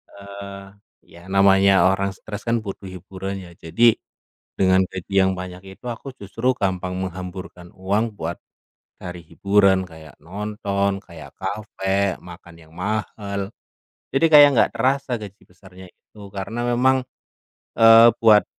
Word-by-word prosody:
eee, 100 0 -9 0.4
ya, 85 - -16
namanya 95 0 +5 0.2
orang 100 +1 -1
stres 105 +2 -9
kan 115 0 +1
butuh 100 -1 -7
hiburan 95 +1 -7
ya. 85 - -13
Jadi, 115 +7 +3 0.6
dengan 95 0 +4
gaji 95 -1 -9
yang 95 0 +2
banyak 90 0 -7 0.2
itu - - -20
aku 125 +3 -7
justru 115 +6 -1
gampang 95 -3 -2
menghamburkan 90 -1 -7
uang 100 +4 -1
buat 85 -1 -4 0.6
cari 90 -1 -8
hiburan 100 +2 +2
kayak 80 -2 -14
nonton, 100 +1 -2
kayak 85 -5 -13
kafe, 100 -1 -2
makan 85 -1 -13
yang 80 -1 -18
mahal. 100 0 -4 0.6
Jadi, 135 +4 +3
kayak 145 -1 +10
nggak - - +3
terasa 130 +1 0
gaji 100 -1 -10
besarnya 95 0 -15
itu. 105 +4 -20
Karena 100 +4 -4 0.2
memang, 130 +1 +3 0.8
eee, 115 +1 +9
buat 110 -2 +6
100 Hz, 130 wpm, -22 LUFS, 95-105 Hz, 0.8 s, kayak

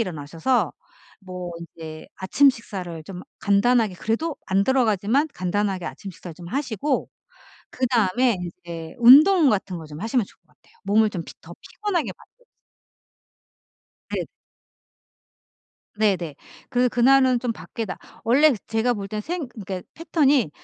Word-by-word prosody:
일어나셔서 165 - -1 0.5
뭐 180 -2 -7
이제 160 -2 -9
아침 270 +9 +4
식사를 185 -9 -7
좀 180 +1 -8 0.2
간단하게 215 0 +3
그래도 250 - -2
안 195 +1 +2
들어가지만 250 - +2
간단하게 190 0 -1
아침 195 - -7
식사를 175 -1 -10
좀 170 +1 -11
하시고 265 +2 -1 0.6
그다음에 240 -2 +2
이제 170 -2 -8
운동 300 +8 +8
같은 190 -4 -1
거 160 - -9
좀 150 0 -10
하시면 225 +1 +1
좋을 - - -21
것 - - -44
같아요. - - -29
몸을 215 +1 +3
좀 175 -4 -4 0.2
더 170 +1 -12
피곤하게 400 -6 -2
만들기. - - -24 1.6
네. - - -2 1.7
네네. 185 -8 +1 0.3
그래서 250 -1 +2
그날은 255 +1 +4
좀 245 -2 -1
밖에 200 +4 -6
나 195 - -6 0.3
원래 275 +5 +5
제가 225 +2 +1
볼 200 -2 -6
땐 210 +1 -3
생 330 +1 -4
그니까 195 -5 -6
패턴이 290 - +2
215 Hz, 285 characters per minute, -23 LUFS, 180-255 Hz, 1.7 s, 운동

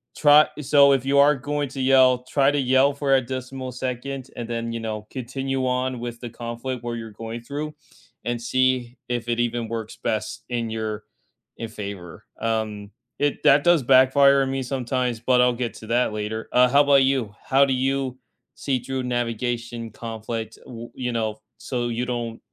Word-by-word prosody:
try 150 0 +6
so, 140 0 +6
if 135 -1 0
you 140 +1 +2
are 145 +1 +6
going 145 +1 -3
to 135 -1 -5
yell, 130 -1 +5
try 140 +1 +3
to 145 - 0
yell 130 +2 +3
for 140 -1 +2
a 130 - +3
decimal 130 0 -6
second 130 +1 -5
and 120 -1 -5
then, 115 0 -3
you 115 - -3
know, 110 -1 -5
continue 135 +1 -3
on 125 0 -1
with 120 -1 -6
the 120 - -6
conflict 120 +2 -5
where 120 0 -3
you're 115 -1 -7
going 115 +1 -6
through 150 +4 -5 0.5
and 120 -1 -1
see 130 0 +1
if 120 -1 -2
it 120 0 0
even 120 -1 -1
works 115 -1 -5
best 110 +2 -3
in 120 -2 -2
your 110 -1 -4 0.5
e 115 - -4
favor. 100 -5 -8 0.2
Um, 110 -2 -2 0.3
it 145 0 0
that 140 +1 +6
does 175 -4 +5
backfire 135 +2 +5
on 135 - -2
me 135 0 -2
sometimes, 125 -2 -2
but 125 +1 +3
I'll 125 0 +4
get 120 -2 -2
to 110 - -10
that 120 -2 +1
later. 105 +1 -4
Uh, 125 0 +5
how 140 +2 +5
about 140 -1 +5
you? 130 -6 0
How 135 +1 +4
do 135 - 0
you 130 0 -1 0.4
see 135 -2 -1
through 130 +1 -4
navigation 120 -1 -3
conflict, 110 0 -6
u 120 -1 -9
you 125 -1 -3
know, 110 -2 -2 0.2
so 120 -2 -3
you 120 +2 -2
don't 120 -2 -4
125 Hz, 185 wpm, -23 LUFS, 115-135 Hz, 0.5 s, try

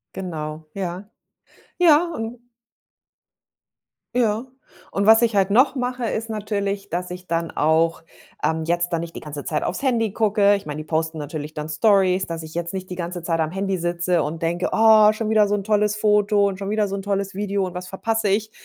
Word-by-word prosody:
Genau. 155 -4 -5
Ja. 190 +1 -5 0.7
Ja, 330 -2 +6
un 235 0 -6 1.7
Ja. 230 -1 +1 0.5
Und 200 - 0
was 225 +1 +8
ich 225 -3 +1
halt 195 -1 +3
noch 255 +7 +4
mache, 250 -1 -2
ist 225 0 -3
natürlich, 200 -2 -3
dass 180 +1 -3
ich 180 0 -8
dann 165 0 -1
auch, 160 +2 +1 0.4
ähm, 160 0 0
jetzt 175 +1 0
da 165 - +1
nicht 165 0 -7
die - - -5
ganze 145 -2 -7
Zeit 155 - -2
aufs 185 - -3
Handy 230 -6 +1
gucke. 205 -2 +3
Ich 200 - -6
meine, 150 - -4
die 155 - -5
posten 160 +1 -2
natürlich 150 +1 -6
dann 150 +1 -5
Storys 190 +2 +3
dass 165 -1 -5
ich 160 0 -10
jetzt 170 +1 -3
nicht 185 -1 -5
die 180 - -5
ganze 175 0 -5
Zeit 165 -1 -1
am 160 0 0
Handy 195 0 -1
sitze 175 0 0
und 160 +2 -5
denke: 175 +2 0
„Oh, 220 -1 +6
schon 215 0 -3
wieder 215 -1 +4
so 205 - +1
'n 200 - -3
tolles 210 0 +1
Foto 210 -1 +3
und 195 -1 -3
schon 195 - -4
wieder 215 -1 +1
so 195 - -4
'n 195 - -4
tolles 200 0 -2
Video 200 -1 -1
und 180 - -6
was 180 0 -6
verpasse 220 +2 -1
ich?“ 215 +2 0
195 Hz, 205 wpm, -22 LUFS, 170-215 Hz, 1.7 s, was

